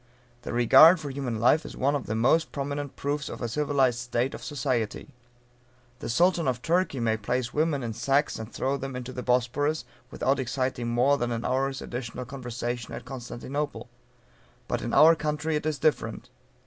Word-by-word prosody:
The - - -6
regard 155 +9 +7
for 145 -3 -5
human 130 -5 -3
life 125 +7 +4
is - - -9
one 140 +2 +2
of 140 - -3
the 110 - -2
most 135 +9 +2
prominent 140 0 -4
proofs 145 0 -2
of - - -7
a 120 - -2
civilized 135 -2 +1
state 120 +2 -1
of - - -8
society. 130 -2 -2 0.9
The - - -5
Sultan 170 +5 +3
of 125 -1 -1
Turkey 170 -5 +1
may 110 -1 +1
place 120 +3 -2
women 150 -3 +1
in 115 -1 -3
sacks 140 +5 +1
and 110 +1 -7
throw 135 +2 -1
them 135 -1 -6
into 125 0 -6
the 125 - -5
Bosphorus, 125 +5 0 0.2
without 135 +1 0
exciting 130 -1 -2
more 125 +4 +2
than 120 0 -1
an 115 0 -3
hour's 135 +1 -1
additional 125 0 -5
conversation 120 -2 -5
at - - -8
Constantinople. 135 +3 -5 0.8
But - - -2
in - - -3
our 160 +2 +7
country 150 0 -2
it 150 +1 -1
is 155 -2 -1
different. 155 +3 -1
130 Hz, 180 wpm, -27 LUFS, 120-145 Hz, 0.9 s, regard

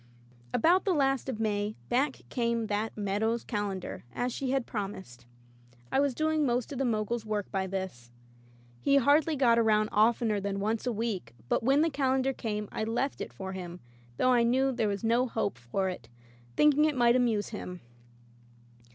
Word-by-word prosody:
About 350 - +3
the 380 -3 +1
last 270 -2 +1
of 235 -4 -4
May 210 -1 -1
back 265 +3 0
came 235 -2 0
that 210 +1 -2
"Meadow's 215 +3 0
Calendar," 205 -4 -4
as 245 - -2
she 270 - -3
had 265 -2 0
promised. 190 - -6 0.6
I - - +2
was 280 -3 +1
doing 310 +1 +1
most 245 -2 0
of 270 - -5
the 270 - +1
Mogul's 225 0 -1
work 210 -2 -3
by 190 -1 -1
this. 185 -11 -5 0.7
He 275 - +2
hardly 290 +4 +4
got 240 -4 +4
around 215 -1 +3
oftener 220 0 +3
than 200 0 -3
once 220 +4 -1
a - - +2
week, 205 - -3
but - - +2
when 270 +5 +3
the 325 0 +2
Calendar 265 -1 +1
came 210 -4 -3
I - - -3
left 240 +5 -2
it - - -5
for 190 0 -6
him, 180 -1 -7 0.4
though 255 - +3
I 240 - +4
knew 260 +3 +2
there 230 -4 0
was 200 0 -3
no 235 +3 +2
hope 220 - -2
for 125 +11 -2
it, 150 -11 -6 0.5
thinking 300 0 +5
it 300 -3 0
might 240 0 +5
amuse 230 -5 +1
him. 180 -5 -7
225 Hz, 180 wpm, -29 LUFS, 205-260 Hz, 0.7 s, thinking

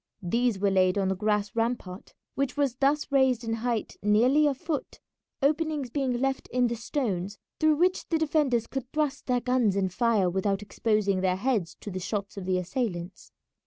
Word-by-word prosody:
These 235 +4 +1
were 200 0 +1
laid 185 0 +3
on 195 -1 +1
the 190 - 0
grass 210 0 0
rampart, 225 -5 -3 0.2
which 275 0 -2
was 280 -4 +1
thus 285 +2 +1
raised 265 -3 +3
in 225 0 -2
height 235 -2 -2
nearly 245 +9 +4
a 280 - +1
foot, 315 0 -4 0.4
openings 300 -3 0
being 270 -2 0
left 265 +2 -1
in 250 0 +1
the 235 0 0
stones 205 -6 -3 0.2
through 310 -1 +4
which 365 +4 +1
the 330 - +2
defenders 295 -7 +1
could 265 0 -6
thrust 300 -2 -1
their 250 -1 +1
guns 250 -5 +2
and 190 -2 0
fire 220 -2 +2
without 195 +2 0
exposing 205 -2 0
their 185 -1 +2
heads 205 -4 -1
to 205 - -6
the 185 - -4
shots 200 +2 -4
of 195 -2 -6
the 185 -1 +2
assailants. 180 -1 -4
235 Hz, 185 wpm, -27 LUFS, 195-270 Hz, 0.4 s, nearly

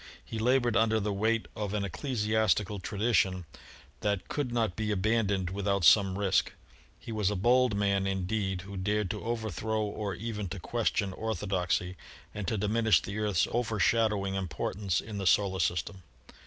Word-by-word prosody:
He 115 - -5
labored 120 0 +2
under 110 -1 +3
the 105 0 -1
weight 110 +3 0
of 105 -1 -3
an 100 -1 -1
ecclesiastical 105 - 0
tradition 95 -2 0 0.5
that 100 -3 -2
could 145 -4 -2
not 115 -5 0
be 110 -1 -2
abandoned 100 -2 +1
without 100 -2 0
some 95 -1 +5
risk. 100 -2 +1 0.5
He - - -8
was 105 -3 +1
a 105 - -1
bold 120 +3 +3
man 100 -1 +1
indeed 95 0 -1
who 100 +1 -8
dared 105 0 0
to - - -6
overthrow 110 -1 -2
or 105 -1 -3
even 105 -4 -4
to 100 +1 -5
question 105 -1 -1
orthodoxy 95 -4 -2 0.4
and 105 -3 -5
to 110 - 0
diminish 105 -2 +3
the 100 +5 -5
Earth's 105 -5 +2
overshadowing 110 -3 +1
importance 95 +1 -2
in 105 -2 -7
the 95 - -1
Solar 95 +1 +3
System. 95 +2 -1
105 Hz, 155 wpm, -30 LUFS, 95-110 Hz, 0.5 s, some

